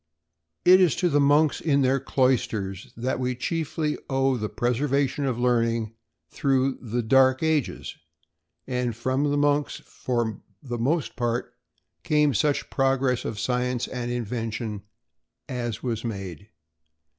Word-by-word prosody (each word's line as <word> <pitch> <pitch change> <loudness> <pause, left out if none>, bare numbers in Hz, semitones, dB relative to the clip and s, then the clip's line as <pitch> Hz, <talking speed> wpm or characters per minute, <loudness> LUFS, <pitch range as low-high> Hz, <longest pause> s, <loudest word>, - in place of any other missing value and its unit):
_] 180 - +7
It 185 - +7
is 175 -5 +4
to 180 - +1
the 145 -2 +3
monks 145 +2 +3
in 140 -3 +2
their 130 +1 +2
cloisters 110 -8 0
that 125 +2 -1
we 125 0 -1
chiefly 155 +3 -2
owe 135 -1 +2
the 110 -3 -3
preservation 135 +5 0
of 130 -3 -1
learning 115 -2 +1 0.3
through 135 -1 0
the 120 0 -2
"dark 130 +4 +4
ages," 160 -4 -1 0.7
and 125 -2 -2
from 130 +5 0
the 145 - +1
monks, 145 0 +1
for 120 -4 -2 0.2
the 120 -3 -4
most 145 +7 0
part, 120 -1 -2 0.5
came 150 -2 +2
such 145 +6 0
progress 135 -2 +1
of 105 - -4
science 125 +1 -1
and 120 -1 -4
invention 115 -2 -3 0.7
as 120 -3 -4
was 115 -3 -2
made. 100 -3 -6
125 Hz, 135 wpm, -25 LUFS, 115-140 Hz, 0.7 s, _]